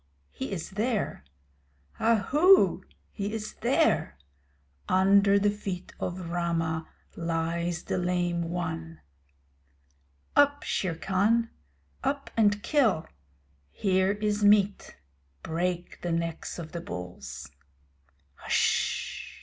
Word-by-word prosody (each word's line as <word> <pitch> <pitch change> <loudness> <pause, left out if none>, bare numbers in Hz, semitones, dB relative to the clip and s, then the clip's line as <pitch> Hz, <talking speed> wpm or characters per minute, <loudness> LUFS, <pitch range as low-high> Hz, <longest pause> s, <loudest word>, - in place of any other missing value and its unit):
_ - - -41 0.3
he 130 - -5
is 175 -3 -5
there. 215 - -1 0.8
Ahoo! 285 - +4 0.3
he 200 0 -4
is 215 -1 -5
there. 65 - +2 0.7
Under 200 +1 +5
the 205 +1 +3
feet 195 -3 -6
of 175 -1 -4
Rama 165 -2 -1 0.3
lies 170 0 -2
the - - -2
Lame 175 -1 0
One! 80 - -4 1.4
Up, 285 0 +4
Shere 180 -4 -1
Khan! 200 +8 +1 0.5
Up 280 0 -2
and 205 -2 +3
kill! 235 - +2 0.6
Here 190 - +1
is 210 0 -1
meat; 205 -1 +3 0.5
break 175 +2 -3
the 175 - -2
necks 165 0 -3
of 165 -2 -7
the 170 - -5
bulls. 70 - -7 1.0
Hsh! - - 0
180 Hz, 100 wpm, -28 LUFS, 165-205 Hz, 1.4 s, Under